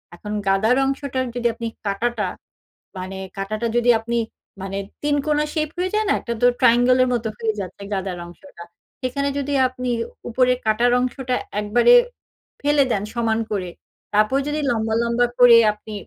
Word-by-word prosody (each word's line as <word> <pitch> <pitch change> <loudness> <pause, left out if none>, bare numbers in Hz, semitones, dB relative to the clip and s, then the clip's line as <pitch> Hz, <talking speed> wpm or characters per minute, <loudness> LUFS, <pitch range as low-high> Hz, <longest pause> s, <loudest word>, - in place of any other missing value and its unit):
এখন 210 +4 -8 0.2
গাদার 205 +5 +3
অংশটার 270 -1 -2
যদি 240 -1 +1
আপনি 230 0 -5 0.2
কাঁটাটা, 210 +1 -1 0.7
মানে 185 +1 -6 0.2
কাঁটাটা 215 +4 -2
যদি 240 0 +2
আপনি 235 +1 -2 0.5
মানে 195 0 -4 0.3
৩ 290 0 +2
কোনা 300 0 +2
শেপ 310 -2 -1
হয়ে 365 +1 -1
যায় 430 0 +1
না? - - +4
একটা 235 - -3
তো - - +4 0.2
triangle 245 +2 +5
এর - - +1
মত 235 -1 -2
হয়ে 225 -2 0
যাচ্ছে 195 +1 -7
গাদার 190 -2 -3
অংশটা। 175 +2 -13 0.4
সেখানে 280 +2 -1
যদি 285 +1 -3
আপনি 250 0 -5 0.4
উপরে 250 +2 +3
কাটার 225 +3 +2
অংশটা 255 0 -2 0.2
একবারে 235 - +4 0.7
ফেলে 290 0 +3
দেন 200 - 0
সমান 225 -1 0
করে। 185 -3 -2 0.4
তারপর 215 +6 +3
যদি 300 +1 -1
লম্বা, 220 -1 -1
লম্বা 235 +1 +2
করে 245 -1 +8 0.2
আপনি 215 0 -11
235 Hz, 160 wpm, -21 LUFS, 210-260 Hz, 0.7 s, করে